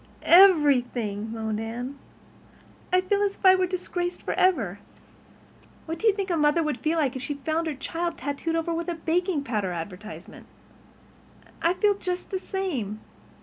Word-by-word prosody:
"Everything," 250 - +4
moaned 220 -1 -3
Anne. 240 +5 -5 1.0
"I 365 0 +4
feel 400 +2 0
as 400 -1 +1
if - - -9
I 375 - +9
were 370 -1 +2
disgraced 355 -1 -3
forever. 225 - +1 1.1
What 325 0 -5
do 450 - +1
you 430 - +6
think 395 -2 -2
a 340 - +1
mother 300 +2 +3
would 300 -5 -2
feel 315 +2 0
like 280 -4 +1
if 260 - -4
she 285 +2 -3
found 315 +4 -2
her 305 - -2
child 335 +5 -3
tattooed 285 +5 -3
over 330 +1 -1
with 335 +1 -3
a 345 - -2
baking 335 -1 0
powder 210 -8 -2
advertisement? 180 +5 -8 1.1
I 340 +2 +2
feel 415 +1 +3
just 365 -2 -5
the 380 - -1
same. 285 - -3
320 Hz, 165 wpm, -26 LUFS, 245-365 Hz, 1.1 s, I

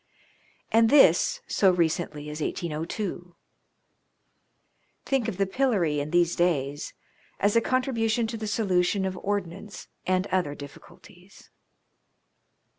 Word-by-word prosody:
And 225 0 +5
this 225 - +5
so 195 - +3
recently 160 -4 -1
as 150 +1 -6
1802. 175 +3 -4 1.7
Think 265 -4 0
of 210 -5 -4
the 195 - +2
pillory 190 - +1
in 145 +1 -3
these 175 +1 +2
days 145 -5 -1 0.4
as 205 +2 +2
a 230 - +5
contribution 235 -3 0
to 225 +1 -4
the 215 -1 -5
solution 195 -2 +1
of 190 0 -3
ordnance 200 0 -5 0.2
and 185 0 +1
other 175 -6 0
difficulties 175 +6 -14
185 Hz, 115 wpm, -26 LUFS, 165-220 Hz, 1.7 s, And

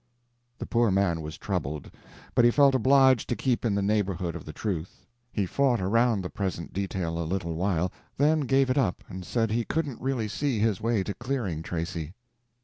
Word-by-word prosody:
The - - -5
poor 120 -1 +2
man 95 -4 +1
was 80 +2 -7
troubled, 75 -7 -3 0.4
but 120 - +4
he 120 - +7
felt 140 +2 +5
obliged 130 0 +4
to 120 - +1
keep 125 -1 0
in 110 -4 +1
the 100 - 0
neighborhood 95 -5 0
of - - -7
the 75 - -6
truth. 90 -2 -4 0.3
He 100 - 0
fought 130 +4 +2
around 110 +2 +2
the 90 - -4
present 95 -4 -4
detail 95 -3 -2
a - - -1
little 85 0 -2
while, 90 +1 0 0.3
then 155 +3 +4
gave 135 -1 +2
it 130 - +2
up 105 -10 0
and 95 -1 -7
said 115 +3 0
he 115 +1 +1
couldn't 145 -2 -2
really 130 -4 -1
see 135 +3 -1
his 105 -2 +1
way 115 -3 +1
to 100 - -4
clearing 120 - -3
Tracy. 85 0 -4
105 Hz, 195 wpm, -27 LUFS, 90-125 Hz, 0.4 s, he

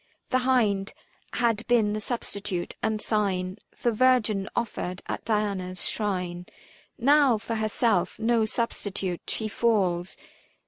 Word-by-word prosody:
The 255 - +4
hind 205 -6 +2 0.4
had 230 -3 +1
been 225 -4 +3
the 215 - -2
substitute 200 -6 -3
and 220 -1 0
sign 195 -3 -1 0.2
For 240 - +1
virgin 220 -5 +3
offered 185 -6 -3
at - - -4
Diana's 200 -4 -1
shrine; 180 -4 -2 0.5
Now 275 -1 +5
for 225 +2 -5
herself, 215 -3 +1
no 225 0 +2
substitute, 205 -5 -2
she 220 - -1
falls. 190 -6 +1
215 Hz, 120 wpm, -27 LUFS, 190-230 Hz, 0.5 s, Now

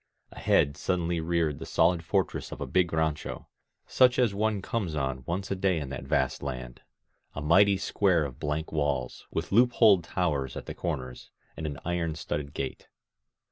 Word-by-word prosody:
Ahead 70 +1 +2
suddenly 85 -2 -1
reared 80 -3 0
the - - -6
solid 85 0 +2
fortress - - -1
of - - -7
a - - -3
big 90 -2 +1
rancho, 80 -2 -2 0.4
such 125 -1 +4
as 120 -5 +3
one 105 0 0
comes 95 -4 -3
on 65 -2 -2
once 95 +4 -3
a - - +1
day 95 -2 +1
in 70 -3 -5
that 65 -1 -6
vast - - 0
land, 65 -3 -6 0.3
— - - -40
a - - -3
mighty 95 +6 +5
square 95 -4 +2
of 65 -3 -8
blank 75 +1 -2
walls, 75 -4 -2
with 80 +1 -4
loop 120 +4 +5
holed 100 -6 +5
towers 75 -7 -1
at - - -7
the - - -6
corners, 65 -8 -5 0.3
and 80 - -4
an 70 -1 -5
iron 85 -2 -1
studded 75 -2 -4
gate. 65 -1 -5
80 Hz, 180 wpm, -28 LUFS, 75-95 Hz, 0.4 s, mighty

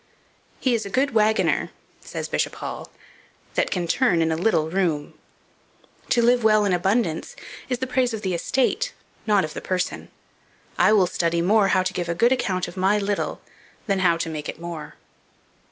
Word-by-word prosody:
"He 255 - +1
is 225 -2 0
a 200 - -6
good 265 +7 +1
waggoner," 220 0 +2 0.3
says - - -6
Bishop - - -1
Hall, - - -6 0.6
"that - - +1
can 180 -3 -1
turn 180 0 +2
in 160 - 0
a - - +1
little 165 -3 +1
room. 165 -4 -1 1.0
To 235 - +3
live 240 0 +3
well 215 -1 +4
in 195 - +1
abundance 190 - 0 0.3
is 250 - 0
the 260 - -2
praise 255 -1 +1
of 220 -1 -5
the 190 -2 -1
estate, 270 - 0 0.3
not 205 -4 +3
of 155 - -8
the - - -6
person. 185 -1 -3 0.7
I - - +4
will 205 -4 +5
study 170 -1 0
more 205 +2 +4
how 185 -1 +2
to 185 - -2
give 175 -1 -3
a 170 - -1
good 235 +8 +3
account 190 -8 0
of 175 - -10
my 190 +3 +3
little, 205 0 -2 0.4
than 195 -2 0
how 170 -3 +3
to 165 - -3
make 155 -2 -5
it - - -7
more." 165 -3 -7
195 Hz, 185 wpm, -23 LUFS, 170-225 Hz, 1.0 s, will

